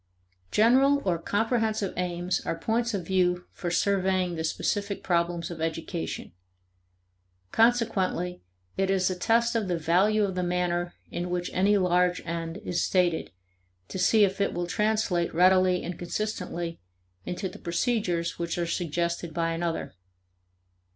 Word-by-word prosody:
General 265 Hz, -, +4 dB
or 175 Hz, -3 st, +1 dB
comprehensive 220 Hz, +1 st, 0 dB
aims 180 Hz, 0 st, -1 dB
are 165 Hz, -, -2 dB
points 230 Hz, +4 st, 0 dB
of 185 Hz, -4 st, -4 dB
view 180 Hz, -1 st, +1 dB
for 175 Hz, -, -4 dB
surveying 185 Hz, 0 st, +1 dB
the 160 Hz, -1 st, -3 dB
specific 200 Hz, +5 st, -2 dB
problems 170 Hz, -1 st, 0 dB
of 165 Hz, -2 st, -7 dB
education. 165 Hz, +1 st, -4 dB, 1.2 s
Consequently 210 Hz, -6 st, +1 dB, 0.4 s
it 195 Hz, 0 st, +1 dB
is 190 Hz, -1 st, +2 dB
a -, -, -2 dB
test 235 Hz, +5 st, +2 dB
of 220 Hz, -4 st, 0 dB
the 175 Hz, -2 st, 0 dB
value 190 Hz, +7 st, +3 dB
of 195 Hz, -2 st, 0 dB
the 180 Hz, -, -1 dB
manner 175 Hz, -1 st, -1 dB, 0.2 s
in 175 Hz, +1 st, -3 dB
which 175 Hz, 0 st, -2 dB
any 200 Hz, +3 st, +3 dB
large 180 Hz, -1 st, +2 dB
end 165 Hz, 0 st, -4 dB
is 175 Hz, -1 st, 0 dB
stated 175 Hz, -3 st, +1 dB, 0.6 s
to 190 Hz, -, -5 dB
see 215 Hz, +3 st, +5 dB
if 195 Hz, 0 st, +1 dB
it -, -, +1 dB
will 175 Hz, -, -1 dB
translate 200 Hz, -3 st, 0 dB
readily 185 Hz, +1 st, +4 dB
and 175 Hz, 0 st, -5 dB
consistently 175 Hz, -3 st, -3 dB, 0.5 s
into 185 Hz, +2 st, -3 dB
the 180 Hz, -, -10 dB
procedures 175 Hz, -2 st, -1 dB
which 170 Hz, 0 st, -2 dB
are 175 Hz, -, 0 dB
suggested 170 Hz, -1 st, -2 dB
by 165 Hz, -1 st, 0 dB
another. 165 Hz, -, -2 dB
180 Hz, 145 wpm, -27 LUFS, 170-200 Hz, 1.2 s, see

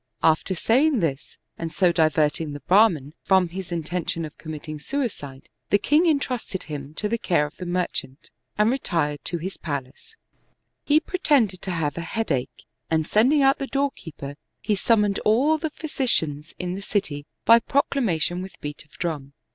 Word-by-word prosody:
After 160 Hz, +4 st, +3 dB
saying 260 Hz, -, +3 dB
this, 145 Hz, -6 st, -3 dB, 0.2 s
and 165 Hz, -1 st, -3 dB
so 180 Hz, 0 st, +3 dB
diverting 155 Hz, -2 st, +1 dB
the 145 Hz, -, -6 dB
Brahman 175 Hz, -8 st, +3 dB
from 190 Hz, -2 st, +3 dB
his 185 Hz, +1 st, -7 dB
intention 170 Hz, 0 st, -2 dB
of 150 Hz, -, -10 dB
committing 155 Hz, -1 st, -7 dB
suicide, 150 Hz, -, -4 dB, 0.2 s
the 205 Hz, -, +5 dB
king 300 Hz, -, +3 dB
intrusted 255 Hz, -, -1 dB
him 145 Hz, -1 st, -7 dB
to 210 Hz, -, -1 dB
the 230 Hz, +2 st, -1 dB
care 170 Hz, -9 st, +2 dB
of 150 Hz, -, -9 dB
the 180 Hz, -, -6 dB
merchant, 175 Hz, -6 st, -3 dB, 0.3 s
and 210 Hz, +2 st, +4 dB
retired 165 Hz, -, -1 dB
to 175 Hz, -, +1 dB
his 185 Hz, +4 st, -5 dB
palace. 145 Hz, -, -6 dB, 0.7 s
There 290 Hz, -, +4 dB
he -, -, +8 dB
pretended 275 Hz, -, +1 dB
to -, -, -5 dB
have 160 Hz, -2 st, -1 dB
a -, -, -2 dB
headache, 165 Hz, -, -3 dB, 0.2 s
and 160 Hz, -1 st, +1 dB
sending 265 Hz, -, +4 dB
out 270 Hz, +1 st, +4 dB
the 275 Hz, -, -3 dB
door 275 Hz, +1 st, 0 dB
keeper, 145 Hz, -, -9 dB, 0.2 s
he 215 Hz, -, 0 dB
summoned 210 Hz, -1 st, +2 dB
all 275 Hz, +9 st, +3 dB
the 315 Hz, -, -2 dB
physicians 170 Hz, -, -1 dB
in 180 Hz, 0 st, -3 dB
the 195 Hz, -, -5 dB
city 155 Hz, -8 st, -2 dB, 0.2 s
by 230 Hz, +1 st, +8 dB
proclamation 220 Hz, -, 0 dB
with 190 Hz, +1 st, -9 dB
beat 145 Hz, +1 st, -6 dB
of 150 Hz, -, -31 dB
drum. 150 Hz, -5 st, -4 dB
180 Hz, 170 wpm, -24 LUFS, 155-230 Hz, 0.7 s, he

